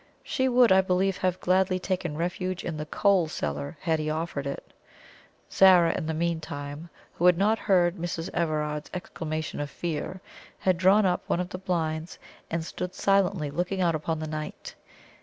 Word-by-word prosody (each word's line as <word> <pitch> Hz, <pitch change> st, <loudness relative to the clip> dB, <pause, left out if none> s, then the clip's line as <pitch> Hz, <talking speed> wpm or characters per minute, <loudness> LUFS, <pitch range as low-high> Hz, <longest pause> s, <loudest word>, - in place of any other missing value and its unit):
She 260 Hz, -2 st, 0 dB
would, 245 Hz, -2 st, +5 dB
I 190 Hz, 0 st, +7 dB
believe, 190 Hz, +1 st, +1 dB
have 185 Hz, -1 st, 0 dB
gladly 185 Hz, +1 st, +2 dB
taken 180 Hz, -4 st, -3 dB
refuge 180 Hz, +2 st, -2 dB
in 170 Hz, -, -3 dB
the 150 Hz, 0 st, -5 dB
coal 195 Hz, -1 st, +3 dB
cellar 70 Hz, -, -4 dB
had 160 Hz, -1 st, +1 dB
he 155 Hz, 0 st, -2 dB
offered 155 Hz, -3 st, -3 dB
it. 140 Hz, -, -7 dB, 0.8 s
Zara, 185 Hz, -3 st, +6 dB
in 155 Hz, -, -3 dB
the 160 Hz, -, -1 dB
meantime, 155 Hz, -2 st, -3 dB, 0.2 s
who 175 Hz, -, +2 dB
had 180 Hz, -1 st, +6 dB
not 215 Hz, +4 st, +2 dB
heard 180 Hz, -2 st, +2 dB
Mrs. 170 Hz, -1 st, -3 dB
Everard's 150 Hz, -2 st, -1 dB
exclamation 160 Hz, -3 st, -4 dB
of 145 Hz, -1 st, -3 dB
fear, 170 Hz, +4 st, -4 dB, 0.4 s
had 185 Hz, -2 st, +1 dB
drawn 195 Hz, +3 st, +5 dB
up 180 Hz, -1 st, +1 dB
one -, -, 0 dB
of 180 Hz, 0 st, -2 dB
the 185 Hz, -, -6 dB
blinds, 165 Hz, -3 st, -2 dB, 0.3 s
and 165 Hz, -1 st, -2 dB
stood 180 Hz, +2 st, -5 dB
silently 195 Hz, -6 st, +1 dB
looking 180 Hz, +4 st, -2 dB
out 175 Hz, -2 st, +2 dB
upon 160 Hz, +1 st, -2 dB
the 155 Hz, -, -4 dB
night. 155 Hz, 0 st, -6 dB
170 Hz, 175 wpm, -27 LUFS, 155-185 Hz, 0.8 s, I